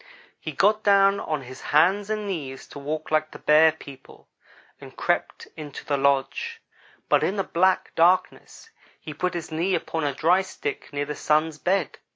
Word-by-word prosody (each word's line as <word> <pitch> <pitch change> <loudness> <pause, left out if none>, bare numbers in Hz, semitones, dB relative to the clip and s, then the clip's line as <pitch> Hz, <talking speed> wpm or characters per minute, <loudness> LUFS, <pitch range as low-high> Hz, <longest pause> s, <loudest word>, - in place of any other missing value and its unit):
"He - - -6
got 210 +2 +2
down 200 -1 +4
on 155 -3 -3
his 130 +1 -11
hands 190 +7 +2
and 215 -1 -2
knees 145 -9 -5
to 145 - -9
walk 155 +3 -5
like 155 0 +1
the - - -11
Bear 155 +1 +5
people 140 -4 -14 0.5
and - - -13
crept - - -2
into 150 -3 -9
the 145 - 0
lodge, 140 - 0 0.5
but - - +3
in 195 - 0
the 195 - 0
black 185 +2 +1
darkness 180 +2 +1 0.3
he 155 - -8
put 180 +4 -2
his 170 -1 -5
knee 175 +4 0
upon 160 -1 -3
a 140 -2 -1
dry 175 +4 +3
stick 415 - -6
near 145 0 -2
the 150 - -4
Sun's 155 +1 0
bed. 185 -5 -1
160 Hz, 180 wpm, -24 LUFS, 150-190 Hz, 0.5 s, Bear